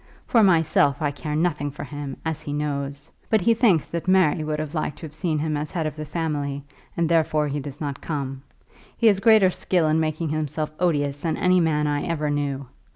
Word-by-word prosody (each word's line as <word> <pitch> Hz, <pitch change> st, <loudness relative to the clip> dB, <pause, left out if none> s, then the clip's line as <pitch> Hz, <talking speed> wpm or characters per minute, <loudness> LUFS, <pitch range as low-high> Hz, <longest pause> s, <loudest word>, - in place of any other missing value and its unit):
For 230 Hz, -, +4 dB
myself, 160 Hz, -7 st, +3 dB
I 145 Hz, -2 st, 0 dB
care 150 Hz, +1 st, -5 dB
nothing 150 Hz, -3 st, 0 dB
for 140 Hz, -, -8 dB
him, 145 Hz, -1 st, -6 dB
as 160 Hz, -1 st, -2 dB
he 145 Hz, -, -5 dB
knows. 145 Hz, 0 st, -3 dB, 0.2 s
But 220 Hz, -2 st, +3 dB
he 230 Hz, +6 st, +4 dB
thinks 210 Hz, -, +3 dB
that 170 Hz, +1 st, -4 dB
Mary 185 Hz, -4 st, +3 dB
would 155 Hz, 0 st, -2 dB
have 155 Hz, 0 st, -4 dB
liked 155 Hz, -3 st, -2 dB
to -, -, -8 dB
have 150 Hz, -, -10 dB
seen 155 Hz, 0 st, -1 dB
him 155 Hz, 0 st, -1 dB
as 150 Hz, +1 st, -2 dB
the -, -, -16 dB
head 165 Hz, -2 st, 0 dB
of 155 Hz, -, -3 dB
the 155 Hz, 0 st, -6 dB
family, 145 Hz, -3 st, -3 dB, 0.3 s
and 170 Hz, -1 st, +2 dB
therefore 155 Hz, -2 st, +2 dB
he 145 Hz, +1 st, -2 dB
does 140 Hz, 0 st, -8 dB
not 145 Hz, -2 st, -4 dB
come. 135 Hz, -4 st, -4 dB, 0.6 s
He 230 Hz, -, 0 dB
has 205 Hz, -3 st, +5 dB
greater 215 Hz, -3 st, +5 dB
skill 175 Hz, -2 st, +1 dB
in 155 Hz, +1 st, +2 dB
making 155 Hz, 0 st, -1 dB
himself 155 Hz, 0 st, -2 dB
odious 145 Hz, -5 st, +1 dB
than 160 Hz, +2 st, -2 dB
any 180 Hz, 0 st, +3 dB
man 155 Hz, -3 st, +1 dB
I 145 Hz, -1 st, 0 dB
ever 155 Hz, -3 st, -1 dB
knew. 140 Hz, -2 st, -2 dB
155 Hz, 220 wpm, -24 LUFS, 145-170 Hz, 0.6 s, has